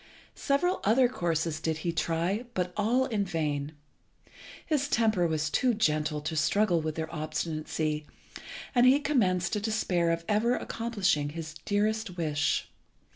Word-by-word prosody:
Several 355 +7 0
other 245 +5 +4
courses 165 -8 -1
did 160 -1 -1
he 170 - +1
try, 170 +7 -1
but 180 -1 -1
all 235 +5 +2
in 220 -6 -1
vain. 155 -5 -2 0.9
His 290 -3 0
temper 220 -9 +2
was 155 -1 -1
too 250 -3 +2
gentle 155 -6 0
to 160 +2 -4
struggle 170 +3 +2
with 155 0 -3
their 160 0 -4
obstinacy, 155 -1 -3 0.7
and 245 -1 +5
he 270 +3 +6
commenced 190 -12 +1
to 210 - +1
despair 200 -5 0
of 165 0 -1
ever 225 +4 +2
accomplishing 195 -10 -1
his 155 0 -6
dearest 210 -1 0
wish. 150 -3 0
175 Hz, 140 wpm, -29 LUFS, 155-220 Hz, 0.9 s, he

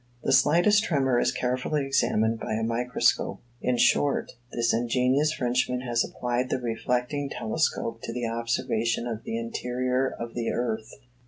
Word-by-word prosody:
The - - +1
slightest 190 +7 +5
tremor 135 -8 +2
is - - +2
carefully 130 +4 -1
examined 115 -4 +1
by - - -3
a 110 - -1
microscope. 120 +2 +1 0.2
In 125 -1 +1
short, 140 +3 +2 0.2
this 115 -1 +1
ingenious 125 +5 +2
Frenchman 125 -2 0
has 120 -2 +1
applied 125 +1 -2
the - - 0
reflecting 125 +4 -1
telescope 115 -3 -1
to - - -5
the 120 0 -3
observation 115 0 -1
of 115 -2 -4
the 115 - -3
interior 125 +3 -1
of 115 0 -5
the 115 -1 -2
earth. 110 -2 -2
125 Hz, 150 wpm, -27 LUFS, 115-130 Hz, 0.2 s, slightest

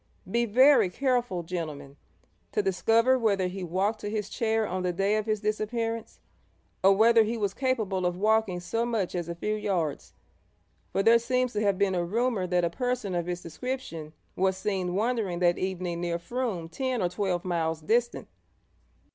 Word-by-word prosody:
'Be 235 +5 0
very 255 -1 +5
careful, 245 -5 0
gentlemen, 155 -5 -5 0.6
to 210 - +1
discover 225 +7 +3
whether 200 -5 +1
he 185 +1 -4
walked 190 +5 -1
to 205 - -3
his 210 -1 -3
chair 225 -1 0
on 185 +1 -3
the 180 0 0
day 195 +4 +1
of 215 0 -1
his 215 -1 0
disappearance, 225 +2 -2 0.6
or 195 +1 +7
whether 225 +3 +5
he 225 +2 0
was 200 -3 -1
capable 220 -8 -1
of 175 0 -2
walking 215 -2 +2
so 225 +6 -2
much 225 -6 -1
as 175 -1 -3
a 170 - -4
few 210 +5 -2
yards; 185 -8 -2 0.8
for 195 - +1
there 230 +2 +6
seems 250 +1 0
to 210 - -1
have 200 -3 +2
been 200 -1 +2
a 175 -1 0
rumour 215 +1 0
that 175 -1 +2
a - - +1
person 250 -4 -2
of 175 -1 -1
his 175 0 -3
description 165 -5 -5 0.2
was 190 0 +1
seen 190 -2 -2
wandering 215 -4 0
that 175 0 +2
evening 180 -2 -3
near 170 -1 -1
Frome 200 -2 -3
ten 255 +8 -2
or 175 - +1
twelve 180 -1 -2
miles 165 -3 -1
distant.' 235 +9 0
200 Hz, 180 wpm, -28 LUFS, 180-230 Hz, 0.8 s, or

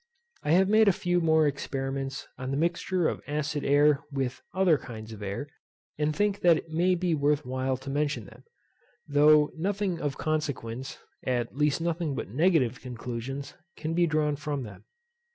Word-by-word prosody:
I 150 - +1
have 190 +2 +5
made 215 +1 +5
a - - +8
few 175 0 0
more 160 -1 +4
experiments 135 -1 -3
on 130 0 -5
the 135 - -1
mixture 170 +2 +1
of - - -3
acid 150 0 -2
air 145 +1 +4
with 135 -2 -2
other 180 -5 +3
kinds 110 -3 -9
of 105 - -10
air, 100 +8 -4 0.5
and 150 0 +1
think 205 -1 +1
that 170 -2 +5
it 160 - -8
may 175 +3 +2
be 175 -1 0
worth 145 0 +1
while 130 +1 -1
to 135 +2 -9
mention 145 +1 -1
them, - - -15 0.6
though 150 +1 +5
nothing 190 +1 -1
of 145 -2 -2
consequence, 135 -5 -3 0.3
at 120 -1 -1
least 150 +2 +1
nothing 165 -3 -1
but - - -4
negative 135 - +2
conclusions, 125 +2 -6 0.2
can 160 +1 -3
be 175 0 +3
drawn 150 -1 +1
from 145 -2 -3
them. 105 -4 -11
150 Hz, 170 wpm, -28 LUFS, 135-165 Hz, 0.6 s, a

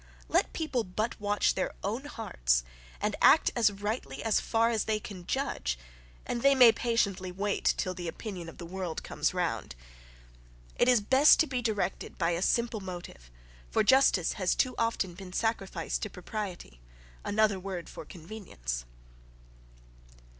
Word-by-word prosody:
Let - - +2
people 285 -7 -1
but 215 +5 -3
watch 205 0 +2
their 190 - -2
own 225 +8 -2
hearts, - - 0 0.4
and - - -1
act - - +6 0.2
rightly 200 - -4
as 220 - +3
far 230 +1 +2
as 220 -2 0
they 215 -1 0
can 185 -4 -9
judge, 165 - -1 0.5
and 240 - -2
they 275 +1 +5
may 250 -3 +9
patiently 200 -6 0
wait 200 +2 0
till 185 - -1
the 175 -1 -6
opinion 180 -1 -6
of - - -13
the 170 - -8
world 180 -2 -4
comes - - -1
round. - - -2 1.0
It 245 - +3
is 245 -3 +5
best 265 +8 +6
to - - +3
be 255 -4 -2
directed 205 -5 -2
by 170 -1 +1
a 170 +1 -1
simple 230 +2 +1
motive 175 - -8 0.4
for - - +2
justice 235 -8 +4
has 180 - +2
too 255 -1 +1
often 230 -6 0
been 180 0 -10
sacrificed 195 -6 -1
to 210 - -3
propriety; 180 - -6 0.4
another 205 -1 +2
word 185 -2 -5
for - - -9
convenience.) 155 - -6
200 Hz, 155 wpm, -30 LUFS, 175-230 Hz, 1.0 s, may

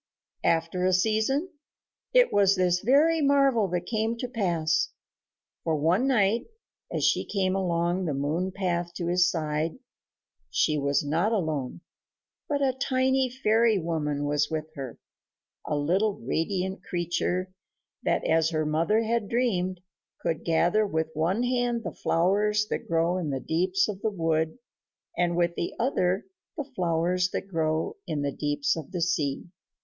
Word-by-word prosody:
after 165 +2 +1
a 185 0 +3
season, 220 - +1 0.6
it - - +4
was 200 -1 +4
this 180 -1 +2
very 300 - +4
marvel 275 -6 +3
that 180 0 -2
came 220 +3 -1
to 250 - -3
pass; 170 -9 0 0.7
for 160 - +1
one 170 - +2
night, 225 -3 +2 0.4
as - - -2
she - - +2
came 190 -2 0
along 175 0 0
the 155 - -1
moon 155 +7 -1
path 175 -2 -2
to 175 - -3
his 175 +1 +3
side, 155 +1 -2 0.7
she 155 - +2
was 140 0 +1
not 165 +9 +1
alone, 155 - -2 0.7
but 285 -1 +1
a 265 -1 +2
tiny 260 0 +1
fairy 230 -3 +2
woman 150 -4 -2
was 145 0 +1
with 155 -1 -2
her 135 -5 -7 0.7
a 150 - 0
little 190 +8 +1
radiant 190 +3 -2
creature 180 +1 -2 0.5
that, - - 0
as 160 0 +3
her 155 -2 -1
mother 165 +9 +2
had 225 -2 -1
dreamed, 185 -7 0 0.4
could 165 -1 -2
gather 175 +5 +2
with 160 -5 -1
one 175 +9 0
hand 245 -1 0
the - - -5
flowers 210 +5 +1
that - - -3
grow 170 +2 +1
in 165 -4 -3
the 135 -1 -2
deeps 185 +6 +1
of 200 -2 -5
the 220 - +1
wood 165 -2 -1 0.6
and 175 -1 +1
with 170 -1 +2
the 170 - -4
other 195 -6 +1 0.3
the 295 - -1
flowers 175 +1 +1
that 195 - -4
grow 160 -3 -1
in 150 -4 -2
the 140 - 0
deeps 145 0 0
of 160 0 -7
the 180 -3 -3
sea. 150 -5 -1
180 Hz, 155 wpm, -27 LUFS, 160-215 Hz, 0.7 s, it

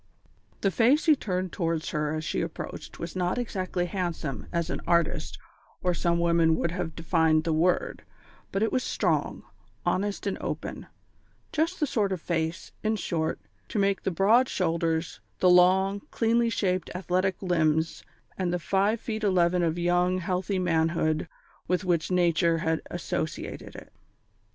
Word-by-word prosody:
The 195 - +2
face 250 - +3
he 315 -3 +6
turned 185 -7 -2
towards 165 -3 -1
her 150 -2 -1
as 155 - -3
she - - -1
approached - - -6
was 170 +1 -6
not 180 +3 0
exactly 185 -7 -2
handsome 170 -7 -3
as 170 -2 -1
an - - -3
artist 170 -2 +1 0.5
or 180 -1 +2
some 170 0 +1
women 170 -1 +3
would 170 - -1
have 175 -3 -4
defined 160 -1 +2
the 165 -1 0
word, 175 +3 +1 0.5
but 195 - 0
it 225 - +1
was 255 - +1
strong, - - 0 0.4
honest, 200 +2 -1
and 200 - -2
open - - -5 0.6
just 330 +4 0
the 305 - +2
sort 210 -7 0
of 185 - -1
face, 165 0 -2
in 220 0 +1
short, 165 -5 -2 0.3
to - - -3
match 195 -1 +2
the - - -1
broad 215 +8 +4
shoulders, 165 - -1 0.2
the 180 - +4
long, 190 +3 +4
cleanly 230 +1 +2
shaped, 185 -5 0
athletic 185 +1 0
limbs, 160 -2 +1 0.4
and 180 -2 0
the 180 - +1
five 200 +5 +1
feet 220 -1 -4
eleven 180 -3 +3
of 165 -1 0
young, 175 +1 +2
healthy 185 +2 -1
manhood 160 -2 +1 0.4
with 180 +2 0
which 170 -3 +1
Nature 170 -2 +3
had 160 0 0
associated 165 -2 -4
it. - - -12
180 Hz, 155 wpm, -27 LUFS, 165-195 Hz, 0.6 s, he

